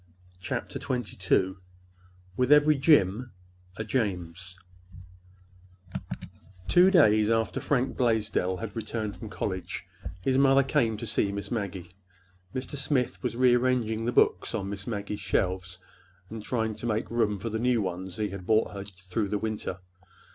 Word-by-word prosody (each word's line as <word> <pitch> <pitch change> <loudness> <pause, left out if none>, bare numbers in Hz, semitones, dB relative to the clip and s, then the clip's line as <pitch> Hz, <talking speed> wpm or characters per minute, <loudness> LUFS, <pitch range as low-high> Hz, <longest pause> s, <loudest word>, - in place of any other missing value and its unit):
CHAPTER 90 - -4
XXII 95 -5 0 0.8
WITH 125 +4 +1
EVERY 150 0 +6
JIM 120 - +3 0.4
A 110 - -2
JAMES 90 -6 -3 2.1
Two 180 +2 +6
days 110 - +5
after 115 0 +1
Fred 130 -2 0
Blaisdell 110 -6 +1
had 110 -1 -6
returned 110 -2 -3
from 110 - -8
college, 95 -4 -4 0.4
his 130 +5 +2
mother 135 0 +5
came 125 -5 +1
to - - -5
see 100 - +1
Miss 100 0 -5
Maggie. 95 -6 -4 0.6
Mr. 130 +3 -4
Smith 135 -3 0
was 120 -2 -2
rearranging 125 -3 +2
the 120 - +1
books - - +2
on 100 - -3
Miss 100 -1 -6
Maggie's 105 -2 -3
shelves 90 -1 -1 0.5
and 110 -1 -6
trying 110 -2 -1
to 120 - -4
make 110 0 -1
room 110 -3 +1
for 110 +4 -5
the 110 - -2
new 125 0 +2
ones 95 -1 -4
he 105 -1 -1
had 95 -1 -8
brought 110 0 +3
her 100 -1 -5
through 95 +1 -4
the 105 - 0
winter. 105 -4 -4
110 Hz, 145 wpm, -28 LUFS, 95-125 Hz, 2.1 s, EVERY